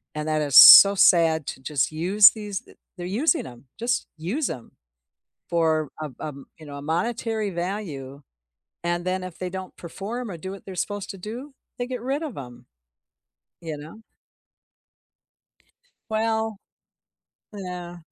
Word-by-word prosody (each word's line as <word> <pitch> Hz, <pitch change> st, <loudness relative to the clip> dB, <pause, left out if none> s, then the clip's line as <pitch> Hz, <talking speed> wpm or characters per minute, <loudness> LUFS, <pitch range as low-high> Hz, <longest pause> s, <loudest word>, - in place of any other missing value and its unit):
and 150 Hz, 0 st, -4 dB
that 155 Hz, -1 st, 0 dB
is 145 Hz, -3 st, -2 dB
so 200 Hz, 0 st, +11 dB
sad 165 Hz, -5 st, +4 dB
to -, -, -6 dB
just 140 Hz, 0 st, -1 dB
use 190 Hz, +6 st, +6 dB
these 210 Hz, -3 st, -6 dB
d -, -, -19 dB, 0.2 s
they're 175 Hz, -, -6 dB
using 290 Hz, -, +1 dB
'em, 120 Hz, +1 st, -14 dB
just 240 Hz, +2 st, -1 dB
use 210 Hz, -, -2 dB
'em 120 Hz, -, -8 dB, 0.8 s
for, 160 Hz, -3 st, 0 dB
um 145 Hz, -5 st, -7 dB
um, 140 Hz, -3 st, -7 dB
you 160 Hz, -, -13 dB
know, 145 Hz, -1 st, -9 dB
a -, -, -9 dB
monetary 215 Hz, +6 st, -2 dB
value, 170 Hz, -7 st, -5 dB, 0.6 s
and 175 Hz, 0 st, -2 dB
then 185 Hz, 0 st, -2 dB
if 185 Hz, -2 st, -9 dB
they 185 Hz, -, -4 dB
don't 190 Hz, 0 st, -8 dB
perform 215 Hz, +7 st, -6 dB
or 175 Hz, -, -6 dB
do 190 Hz, +3 st, -7 dB
what 195 Hz, -, -11 dB
they're 190 Hz, -, -8 dB
supposed 205 Hz, +2 st, -4 dB
to 195 Hz, -, -11 dB
do, 240 Hz, +9 st, -8 dB, 0.2 s
they 245 Hz, -, -3 dB
get 250 Hz, -2 st, -5 dB
rid 270 Hz, +5 st, -2 dB
of 290 Hz, -9 st, -7 dB
'em, 125 Hz, -2 st, -10 dB, 1.0 s
you 160 Hz, -2 st, -5 dB
know? 155 Hz, +9 st, -12 dB, 2.1 s
Well 220 Hz, 0 st, -1 dB, 1.0 s
Yeah. 180 Hz, -3 st, -7 dB
185 Hz, 150 wpm, -24 LUFS, 155-215 Hz, 2.1 s, so